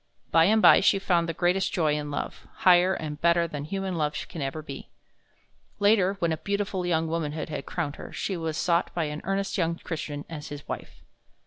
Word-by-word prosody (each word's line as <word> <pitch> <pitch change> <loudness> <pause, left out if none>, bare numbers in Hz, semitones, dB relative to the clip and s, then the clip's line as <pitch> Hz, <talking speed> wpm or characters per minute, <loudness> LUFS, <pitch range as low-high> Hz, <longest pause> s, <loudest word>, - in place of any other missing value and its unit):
By 165 0 +6
and 220 +3 +3
by - - +9
she 195 - +4
found 175 -4 +1
the - - +2
greatest 180 +3 +1
joy 160 -6 +1
in 150 0 -3
love, 145 - -5 0.2
higher 180 +1 +6
and 150 -3 -6
better 170 0 +3
than 145 -2 -5
human 195 +2 -3
love 150 -2 -1
can 165 - -6
ever 140 +3 -3
be. 140 -2 -8 0.9
Later, 200 -2 +3
when 170 -3 0
a 160 - 0
beautiful 195 +1 -2
young 165 -2 +1
womanhood 160 -1 -3
had - - -5
crowned 155 -4 -3
her, - - -9
she 195 - -3
was 160 -2 -3
sought 170 -1 +1
by 170 - +1
an 150 0 -4
earnest 195 +2 -1
young 165 -1 +1
Christian 150 -4 -5
as 155 -2 -7
his 145 -1 -8
wife. - - -7
170 Hz, 205 wpm, -27 LUFS, 155-185 Hz, 0.9 s, by